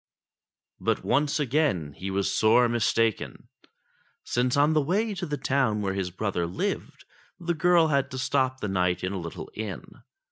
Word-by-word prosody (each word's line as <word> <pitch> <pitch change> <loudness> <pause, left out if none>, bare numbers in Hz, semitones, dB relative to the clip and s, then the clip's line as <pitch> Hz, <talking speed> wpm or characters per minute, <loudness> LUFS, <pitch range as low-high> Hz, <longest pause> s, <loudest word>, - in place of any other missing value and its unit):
But - - 0
once 145 +3 +1
again 130 - 0
he 95 +5 -6
was 95 0 0
sore 115 +3 +4
mistaken; 115 -1 0 0.7
since 125 +2 0
on 145 +2 +4
the 155 - +3
way 205 +9 0
to 180 -2 -4
the 145 -1 -2
town 130 -6 +1
where 95 -1 -1
his 95 -2 -2
brother 90 -2 -2
lived, 90 - -4 0.3
the 175 -1 -1
girl 170 0 +4
had 140 -2 +1
to 130 - -6
stop 130 0 0
the 105 - -2
night 90 -2 0
in 90 +2 -2
a 95 - -3
little 85 -1 -7
inn. 105 -3 -5
125 Hz, 170 wpm, -26 LUFS, 95-145 Hz, 0.7 s, sore